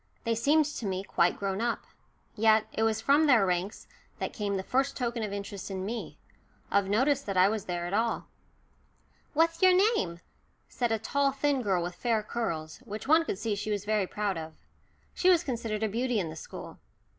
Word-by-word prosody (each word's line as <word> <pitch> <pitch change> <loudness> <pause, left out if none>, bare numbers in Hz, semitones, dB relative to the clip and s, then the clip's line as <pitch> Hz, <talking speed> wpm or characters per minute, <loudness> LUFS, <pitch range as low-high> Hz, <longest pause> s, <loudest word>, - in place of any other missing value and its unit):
They 230 - +1
seemed 295 +7 +3
to 280 -7 -4
me 190 0 -2
quite 175 -3 +1
grown 195 +1 -2
up. 235 0 -1 0.5
Yet 220 0 +4
it - - -2
was 220 -1 +2
from 285 +6 +4
their 240 -8 +5
ranks 185 +3 -2 0.3
that - - -4
came 200 -2 -2
the 190 - -3
first 270 +6 0
token 240 -2 -2
of 210 -2 -3
interest 200 -1 -6
in 190 -1 -4
me 230 +3 -5 0.5
of 200 -1 +2
notice 265 +7 +2
that 195 -7 -4
I 185 +1 +6
was 215 -2 -3
there 175 -1 -3
at 175 - -4
all. 225 +2 0 1.1
"What's 330 +2 +2
your 370 -1 +7 0.2
name?" 170 - -2 0.5
said 240 -2 -1
a 225 - +2
tall 275 +5 +1
thin 275 0 0
girl 190 -6 +1
with 175 +1 -4
fair 225 +1 0
curls, 165 -9 -3
which 220 -2 -8
one 320 +2 +5
could 195 - -3
see 220 +1 -2
she 205 +1 -4
was 205 -1 -2
very 210 -2 +1
proud 200 -4 -2
of. 160 0 -7 0.6
She 370 - +3
was 350 -2 +5
considered 225 -4 -3
a - - +2
beauty 235 +2 0
in 165 -5 -3
the - - -8
school. 160 - -9
220 Hz, 205 wpm, -29 LUFS, 195-250 Hz, 1.1 s, your